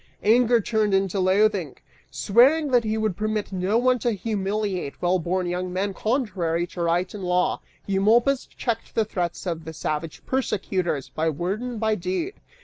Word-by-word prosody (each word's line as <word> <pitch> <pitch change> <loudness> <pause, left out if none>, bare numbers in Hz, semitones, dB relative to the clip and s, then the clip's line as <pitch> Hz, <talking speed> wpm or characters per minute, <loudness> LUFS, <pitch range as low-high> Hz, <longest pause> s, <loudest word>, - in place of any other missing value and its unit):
Anger 235 +2 +5
turned 215 -2 +1
into 195 0 0
loathing. 190 -4 +2 0.3
Swearing 250 - +3
that 245 -2 +4
he 220 0 -1
would 215 -4 0
permit 215 0 -2
no 190 +3 +1
one 255 +1 +3
to 235 0 0
humiliate 200 -5 -2
well 180 +1 +2
born 180 +2 -1
young 180 +1 -2
men 195 +2 -1
contrary 185 -8 -1
to 175 0 -7
right 170 +2 0
and 205 -2 -7
law, 180 0 +1 0.2
Eumolpus 230 +8 +2
checked 230 -2 -4
the 225 - +2
threats 180 -4 -3
of 165 -3 -3
the 160 +1 -7
savage 155 +1 -4
persecutors 190 - -1
by 160 +1 -1
word 175 +8 -2
and 245 -2 -4
by 220 0 +1
deed. 190 - -2
195 Hz, 165 wpm, -24 LUFS, 180-220 Hz, 0.3 s, Anger